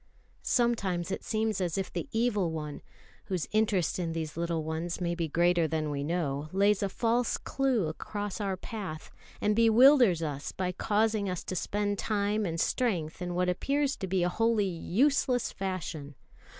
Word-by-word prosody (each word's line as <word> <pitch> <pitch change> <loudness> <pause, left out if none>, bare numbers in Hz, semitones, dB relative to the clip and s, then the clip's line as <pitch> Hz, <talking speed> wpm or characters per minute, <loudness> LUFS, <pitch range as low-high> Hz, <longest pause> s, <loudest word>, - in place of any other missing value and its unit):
Sometimes 195 -8 +1
it - - -3
seems 220 -2 -1
as 175 0 -1
if 190 -1 -3
the - - -4
Evil 220 -6 +1
One, 150 -2 -5 0.4
whose 185 -4 -2
interest 205 -6 +1
in 165 -2 -2
these 160 -2 -4
little 170 -1 -1
ones 160 +2 -3
may 175 -1 -1
be 170 -1 -2
greater 170 +1 +3
than 155 -1 -1
we 140 -1 -2
know, 150 -2 -2
lays 200 +1 +3
a 200 - 0
false 235 +4 +1
clue 265 -8 0
across 205 +6 -5
our 195 -2 -1
path, 190 -7 -7 0.3
and 210 0 +2
bewilders 230 - +6
us 145 -2 -4
by 185 -1 -2
causing 210 +1 +1
us 180 -2 -3
to 185 - -4
spend 205 +2 -1
time 210 -1 0
and 165 0 -3
strength 180 -11 0
in 175 -1 -3
what 180 0 +1
appears 275 +10 0
to 190 - -4
be 185 -1 +1
a 175 - +2
wholly 225 +1 +2
useless 245 - +1
fashion. 165 -7 -5
190 Hz, 170 wpm, -29 LUFS, 170-220 Hz, 0.4 s, bewilders